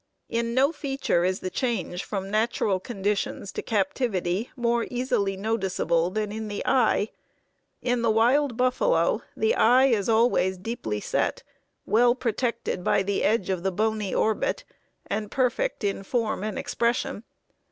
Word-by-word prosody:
In 235 0 -1
no 275 +3 +4
feature 270 - -1
is 185 +1 0
the 185 - -4
change 190 -6 -2
from 195 -1 -4
natural 215 -3 +1
conditions 200 -1 -2
to - - -4
captivity 200 -1 -1
more 235 -1 0
easily 225 -6 0
noticeable 190 -5 0
than 210 +1 -2
in 220 0 -5
the 205 -1 -4
eye. 225 -4 +2 0.7
In 245 -1 +1
the 230 - +2
wild 240 +4 +3
buffalo 255 - +2 0.2
the 445 +1 +2
eye 255 - +5
is 230 -5 +1
always 220 -5 +3
deeply 180 - -4
set, - - -1 0.4
well 240 +2 +4
protected 235 -6 -2
by 195 - +2
the 200 0 -1
edge 205 -3 +1
of 185 -2 -1
the 190 +1 0
bony 215 0 -1
orbit, 220 - 0 0.4
and 210 0 -3
perfect 270 - 0
in 200 -1 -1
form 215 0 -1
and 215 0 -3
expression. 235 -2 -1
220 Hz, 145 wpm, -26 LUFS, 195-245 Hz, 0.7 s, eye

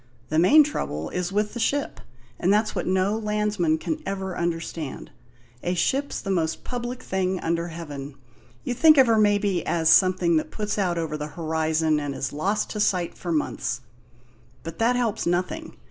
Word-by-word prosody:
The 155 - +2
main 290 - +7
trouble 80 - -4
is 180 0 -2
with 210 +1 0
the 240 - -5
ship, 280 +5 -1 0.4
and 180 - +2
that's 215 +1 +2
what 180 - -3
no 190 +3 +2
landsman 210 -6 0
can 315 - -3
ever 190 -6 -4
understand. 165 -3 -4 0.5
A 180 +1 -1
ship's 275 +10 0
the 195 - -3
most 165 -4 -1
public 245 0 -5
thing 190 -1 -1
under 170 +1 -1
heaven. 145 -4 -7 0.5
You 250 - -2
think 305 +5 +6
of 265 - +8
her, 225 -2 +3
maybe, 205 -4 +2
as 165 -2 +1
something 185 -3 +4
that 155 - -2
puts 210 -1 -3
out 180 -3 0
over 160 -2 -2
the 150 0 -4
horizon 160 -1 +1
and 145 -2 -4
is 135 - -3
lost 195 +8 -1
to 210 - -4
sight 180 -4 +1
for 175 - -5
months. 145 -5 -1 0.8
But 165 0 -8
that 235 +2 +3
helps 230 -6 -1
nothing. 185 - -2
185 Hz, 175 wpm, -25 LUFS, 165-215 Hz, 0.8 s, of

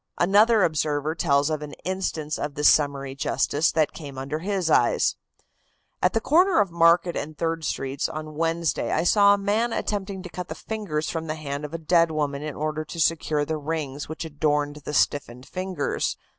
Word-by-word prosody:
Another 210 +4 +4
observer 155 -1 0
tells 145 -3 +2
of 155 -1 -2
an 150 -1 -7
instance 175 -5 -2
of 145 -1 -4
this 150 0 +3
summary 140 -2 +2
justice 140 +3 +1
that 155 -2 +1
came 140 -4 -9
under 135 +4 -3
his 190 -1 -1
eyes: - - +3 0.9
"At - - +3
the 225 - +2
corner 350 - +4
of 200 -4 +2
Market 170 +1 +4
and 150 +1 -5
Third 165 -1 -2
Streets 135 -1 -2
on 155 0 -6
Wednesday 165 +1 -1
I - - +1
saw 200 +2 +5
a - - -4
man 210 +4 0
attempting 200 -3 -3
to 180 - -8
cut 180 0 -6
the - - -6
fingers 190 -9 -3
from 165 -1 -4
the 155 - -2
hand 145 -1 -5
of 150 - -9
a - - -1
dead 165 +1 +3
woman 145 -3 -2
in 150 -1 -5
order 155 +1 -2
to 165 +2 -8
secure 155 -2 +1
the 160 +1 -2
rings 150 -2 -4
which 160 +1 -5
adorned 150 -1 -1
the 150 0 -7
stiffened 130 -4 0
fingers. 185 -5 -2
155 Hz, 190 wpm, -25 LUFS, 145-180 Hz, 0.9 s, saw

